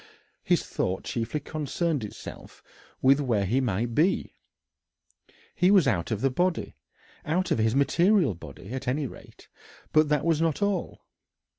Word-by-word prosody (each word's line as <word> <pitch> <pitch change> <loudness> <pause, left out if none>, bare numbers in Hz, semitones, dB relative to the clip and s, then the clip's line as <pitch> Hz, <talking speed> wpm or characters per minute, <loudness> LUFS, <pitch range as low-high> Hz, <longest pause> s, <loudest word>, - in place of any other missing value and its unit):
His - - +1
thought 95 +1 -2
chiefly 115 +6 -3
concerned 155 -1 -2
itself 105 - -10 0.4
with 135 +2 +5
where 115 -8 +1
he 120 +8 +1
might 115 0 -1
be. 165 +9 +1 1.2
He 180 0 +3
was 190 -7 +5
out 95 -9 0
of 110 -2 -2
the 135 - +2
body 175 +6 -1 0.5
out 180 +5 -1
of - - +2
his 110 +2 +2
material 170 - +3
body, 80 +2 -11
at 130 0 -5
any 140 +3 0
rate 125 - -12 0.5
but 155 -1 +4
that 150 0 +1
was 165 -2 +2
not 160 -3 +1
all. 200 -4 -2
140 Hz, 150 wpm, -27 LUFS, 115-165 Hz, 1.2 s, with